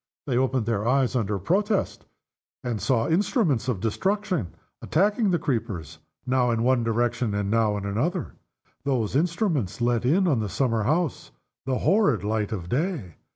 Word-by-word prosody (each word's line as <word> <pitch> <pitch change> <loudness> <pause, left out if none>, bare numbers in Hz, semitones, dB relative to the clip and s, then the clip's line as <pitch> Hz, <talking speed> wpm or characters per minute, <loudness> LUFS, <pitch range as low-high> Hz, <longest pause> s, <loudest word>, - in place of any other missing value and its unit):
They 130 - -1
opened 130 -2 +1
their 115 -1 -1
eyes, 130 0 +2
under 105 -4 0
protest, 200 - 0 0.6
and 120 -4 -3
saw 120 -4 +1
instruments 165 - +1
of 120 -7 -1
destruction 185 - -1 0.3
attacking 205 +5 +2
the 175 - +2
creepers. 105 - -3 0.3
Now 125 -1 +2
in 115 -1 0
one 125 -1 +3
direction, 115 -1 0
and 100 0 -1
now 110 -2 +2
in 100 - -5
another, 145 - -2 0.5
those 125 -5 -1
instruments 165 - 0
let 120 -1 +1
in 175 +9 +3
on 140 -8 +2
the 105 -2 -2
summer 115 -2 0
house 160 +1 0 0.4
the 130 -1 +1
horrid 185 - +3
light 105 0 -1
of 90 -6 -4
day. 130 - -2
125 Hz, 155 wpm, -25 LUFS, 110-160 Hz, 0.6 s, one